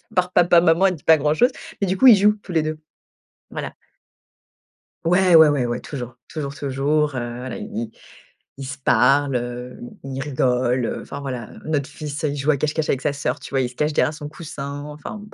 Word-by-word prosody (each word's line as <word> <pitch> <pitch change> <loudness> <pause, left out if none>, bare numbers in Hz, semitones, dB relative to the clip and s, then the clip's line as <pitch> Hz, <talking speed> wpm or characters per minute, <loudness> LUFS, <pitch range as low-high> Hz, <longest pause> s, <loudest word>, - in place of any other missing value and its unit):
part 180 0 +1
«Papa, 175 -1 +5
maman,» 170 +3 +4
elle 185 - 0
dit 150 - -16
pas 160 - +6
grand-chose. 155 - +2 0.3
Mais 200 - +1
du 190 - 0
coup, 265 - +6
ils 235 - +10
jouent 210 +2 +3
tous 185 - -10
les 165 -2 +2
2. 155 0 -4 0.7
Voilà. - - -6 1.3
Ouais, 180 +1 +4
ouais, 160 -1 +8
ouais, 140 -4 +1
ouais, 120 +1 -3
toujours 125 -4 -7
toujours 145 -3 -5
toujours, 145 +1 0
heu, 120 -1 -4
voilà, 125 -1 -6
i - - -6
i 115 0 -4 0.7
ils 135 - -6
se 140 +2 -6
parlent, 135 +2 +3
heu, 125 +1 -4 0.3
i 135 - -6
ils 135 - -3
rigolent, 125 -3 0
heu, - - -3
enfin 140 - -8
voilà, 125 -5 -5
heu. - - -13
Notre 145 -3 -1
fils, 150 +1 -6
heu, 150 - +1
il 145 - -4
joue 140 +3 +2
à - - +2
cache-cache 155 +2 -1
avec 135 - 0
sa 150 - 0
sœur, 140 - -2
tu - - -9
vois, 135 - +1
il 125 - 0
se 125 - -16
cache 150 +3 0
derrière 150 - +2
son 150 -1 -8
coussin 145 -3 -7
enfin, 150 +7 -8
b. 210 +1 -14
145 Hz, 225 wpm, -22 LUFS, 130-160 Hz, 1.3 s, ils